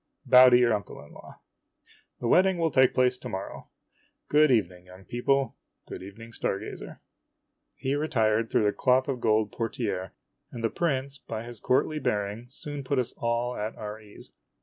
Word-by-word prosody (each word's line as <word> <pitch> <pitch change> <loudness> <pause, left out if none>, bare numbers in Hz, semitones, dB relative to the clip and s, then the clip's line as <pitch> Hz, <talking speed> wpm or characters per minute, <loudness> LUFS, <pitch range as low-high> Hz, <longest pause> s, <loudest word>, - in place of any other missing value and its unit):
Bow 125 0 +8
to 125 - +6
your 120 -2 +3
uncle 105 -1 -4
in - - -17
law. - - -14 0.8
The 120 - -1
wedding 185 +7 +4
will 165 -2 +1
take 130 -1 +4
place 125 0 +2
to 125 - -7
morrow. 95 -3 -7 0.6
Good 150 +1 +5
evening, 90 -7 0
young 90 +1 -15
people. 135 +3 0 0.3
Good - - -8
evening, 110 +5 -11
star 95 - -2
gazer." 105 - -9 0.7
He 135 - -2
retired 115 -7 +1
through - - +2
the 105 - +3
cloth 130 0 +2
of 130 -4 -3
gold 110 -2 +2
portiere, 110 -5 -3 0.4
and 115 - -7
the 115 - +1
prince, 140 -4 -1
by 110 0 -6
his 120 -2 -9
courtly 150 +6 +1
bearing, 105 0 -2
soon 145 +1 -7
put 135 +1 -1
us 125 -2 -1
all 120 +1 -1
at 105 +2 -4
our 105 0 -7
ease. 105 -1 -14
120 Hz, 175 wpm, -27 LUFS, 110-130 Hz, 0.8 s, Bow